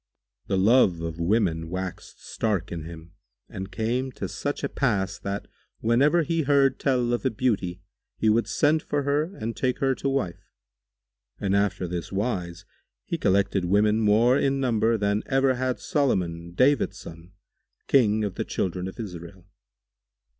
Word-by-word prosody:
The 95 - 0
love 95 -4 +4
of 85 0 -5
women 85 -3 +1
waxed 95 0 -6
stark 105 -6 -2
in 80 -2 -5
him 85 0 -10 0.4
and 95 +1 -7
came 120 +6 -1
to - - -4
such 145 0 -4
a - - +1
pass 100 -7 -1
that, 100 0 -4 0.3
whenever 140 +9 +3
he 165 +1 0
heard 140 -2 +3
tell 125 -3 +1
of 120 - -1
a - - +2
beauty, 100 -6 -1 0.4
he 110 - 0
would 110 +2 +3
send 155 +1 +2
for 145 -1 -2
her 150 +6 0
and 115 +1 -4
take 130 -1 0
her 135 -1 +1
to 135 - -2
wife; 135 -11 -3 0.9
and 100 0 0
after 100 -2 0
this 85 -1 -5
wise, 95 -5 -3 0.4
he - - -3
collected 95 -1 +2
women 105 +4 +3
more 115 +5 +4
in 135 0 +1
number 115 -3 +2
than 100 0 0
ever 135 0 +3
had 130 0 -2
Solomon, 85 - -1
David 135 +5 +3
son, 85 +2 -12 0.5
King 110 -5 +3
of 100 -3 -2
the - - -3
children 90 0 -2
of 95 - -9
Israel. 90 -3 -8
105 Hz, 160 wpm, -25 LUFS, 90-130 Hz, 0.9 s, love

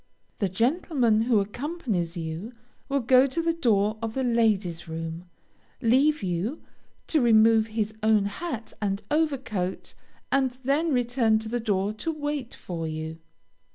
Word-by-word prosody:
The 200 - +1
gentleman 240 - +2
who 235 -4 +4
accompanies 210 - -3
you 165 +8 -5 0.4
will 280 0 +1
go 255 +3 +5
to 275 +5 -3
the 330 0 +1
door 215 -8 +1
of 225 -1 -4
the 265 - 0
lady's 210 -8 +1
room, 165 +1 -5 0.5
leave 265 +3 +3
you, 190 - -2 0.4
to 310 - +2
remove 225 -1 +5
his 215 -1 -2
own 215 -2 +3
hat 230 +2 -5
and 200 0 -1
over 305 -2 +2
coat, 190 -8 -4 0.4
and 265 -2 +1
then 295 +5 +1
return 245 -3 +2
to 220 0 -5
the 240 +1 -1
door 205 -2 0
to 325 +10 -3
wait 290 -5 -4
for 165 -3 -5
you. 160 +1 -5
225 Hz, 150 wpm, -26 LUFS, 195-265 Hz, 0.5 s, go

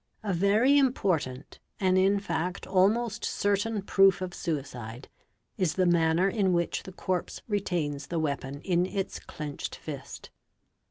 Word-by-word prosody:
A 200 -3 -1
very 215 +10 +4
important 165 - 0 0.2
and 185 -1 +3
in 195 +2 +4
fact 180 -1 -3
almost 215 +4 +2
certain 205 +1 0
proof 195 -1 +4
of 185 -1 -4
suicide 130 -7 -5 0.5
is 180 -6 0
the 185 - +2
manner 170 +1 +3
in 195 -2 +1
which 170 -1 0
the 190 - -10
corpse 185 -1 -3
retains 170 -9 -2
the 170 - -3
weapon 140 -2 -2
in 180 0 +1
its 195 0 -3
clenched 150 -2 -6
fist. 140 -3 -8
185 Hz, 140 wpm, -28 LUFS, 155-200 Hz, 0.5 s, very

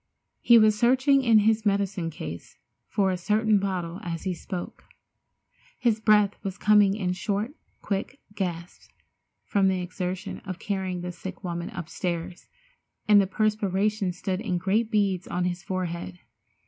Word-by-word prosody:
He 235 - +6
was 215 -1 +5
searching 260 +4 +4
in 230 -4 +5
his 220 0 +3
medicine 200 -4 0
case 85 - -8 0.3
for 195 -2 +1
a 185 - -1
certain 215 +3 +2
bottle 185 -2 -3
as 165 -2 -5
he 190 - -1
spoke. 175 +1 -7 0.9
His 235 -3 +1
breath 210 -2 +3
was 195 -1 -4
coming 205 -2 +4
in 185 -4 -1
short, 205 +5 -2 0.3
quick 205 +7 -3
gasps 175 -3 -5 0.6
from 195 -2 +2
the 190 -1 +1
exertion 180 +2 -4
of 185 -3 -7
carrying 190 -3 -3
the 180 0 -4
sick 190 +3 -9
woman 170 -1 -4
upstairs, 170 0 -5 0.6
and 205 -1 +7
the 195 - 0
perspiration 210 -1 0
stood 185 +2 -3
in 190 -6 -1
great 200 +5 +1
beads 200 -4 +1
on 180 - -2
his 180 0 -2
forehead. 170 - -4
195 Hz, 150 wpm, -26 LUFS, 180-210 Hz, 0.9 s, and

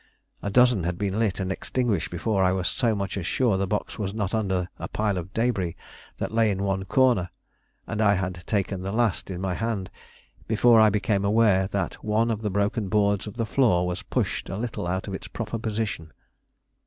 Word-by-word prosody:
A 100 - -2
dozen 125 -3 +4
had 85 +1 -2
been 100 +1 -1
lit 105 -5 +1
and 95 -1 -2
extinguished 115 -2 -1
before 95 +3 0
I 90 - +4
was 95 -2 -1
so 115 -4 +1
much 100 0 -3
as 85 - -4
sure 120 -4 +2
the 95 0 0
box 105 +2 -3
was 100 -1 -3
not 100 -2 -2
under 95 -5 0
a - - -4
pile 105 -2 -1
of 90 0 -5
debris 105 -7 0 0.4
that - - -3
lay 115 -1 +3
in 100 -1 -1
one 95 -1 -1
corner, 120 -6 +3 0.6
and 110 -1 -3
I 100 -1 +5
had 90 -2 -3
taken 100 -2 -1
the 95 +1 -3
last 110 -4 0
in 90 -2 -4
my 95 -1 -1
hand 110 -2 -3 0.6
before 115 +1 +5
I 110 0 +7
became 100 -1 0
aware 100 -2 +3
that 100 0 -3
one 110 +2 +1
of 110 -1 -2
the 105 - -1
broken 100 +1 0
boards 100 -1 +2
of 105 - -8
the 115 - 0
floor 110 -7 +3
was 90 0 -3
pushed - - -2
a 95 - -4
little 110 -5 -3
out 95 +3 -2
of 100 - -4
its 95 - -6
proper 115 0 -4
position. 105 -7 -3
100 Hz, 210 wpm, -25 LUFS, 95-110 Hz, 0.6 s, I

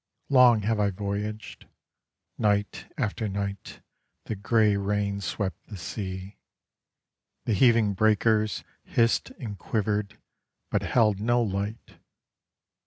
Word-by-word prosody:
Long 125 -5 +6
have 110 +1 0
I 105 -1 +3
voyaged, 100 +2 -5 0.7
Night 105 -1 0
after 110 +1 -1
night 100 0 -5 0.4
the 110 - -3
grey 105 +1 +2
rains 100 0 -1
swept 95 0 -4
the 105 - -8
sea: 95 +2 -6 1.1
The 115 - +1
heaving 115 -2 +4
breakers 110 +1 +2 0.2
Hissed 115 0 +1
and 105 -7 -6
quivered 105 -1 -1 0.5
but - - +1
held 105 -5 +2
no 120 +3 +2
light. 100 +2 -4
105 Hz, 105 wpm, -27 LUFS, 100-110 Hz, 1.1 s, Long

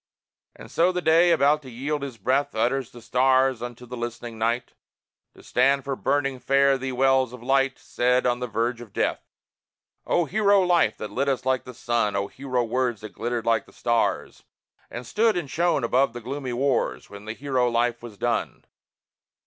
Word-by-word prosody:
And - - -13
so 175 +2 +3
the 180 - -2
Day, 165 +2 +5
about 150 -2 +3
to 130 - -11
yield 140 +5 -3
his 135 -4 -6
breath, 135 +3 0
Utters 120 +3 0
the 120 -1 -14
stars 130 0 +2
unto 120 0 -7
the 125 +1 -8
listening 120 -1 -6
Night, 115 +2 -1 0.6
To - - -16
stand 135 +2 +2
for 135 -1 -3
burning 135 -1 -1
fare 135 +1 +3
thee 130 0 -3
wells 130 -1 +2
of 125 -2 -10
light 135 +1 +2
Said 125 +1 0
on 120 0 +1
the 125 - -3
verge 115 +2 -2
of 110 -5 -12
death. - - 0 0.9
O 175 - +2
hero 200 +3 +3
life 175 -2 +2
that 105 -1 -6
lit 140 +6 0
us 130 -2 -1
like 130 -1 0
the 125 - -9
sun! 120 -4 0
O 100 0 0
hero 130 +1 -2
words 120 -1 -1
that 110 - -7
glittered 120 0 -3
like 115 -2 +1
the - - -19
stars 120 -1 -1 0.5
And 120 - -7
stood 220 - +2
and 160 -6 -4
shone 175 -4 +1
above 130 +4 +2
the 120 - -7
gloomy 130 +1 -5
wars 130 0 -1
When 100 0 -10
the 110 - -4
hero 130 -1 0
life 120 0 0
was 115 -4 -10
done! - - -2
125 Hz, 190 wpm, -25 LUFS, 120-140 Hz, 0.9 s, Day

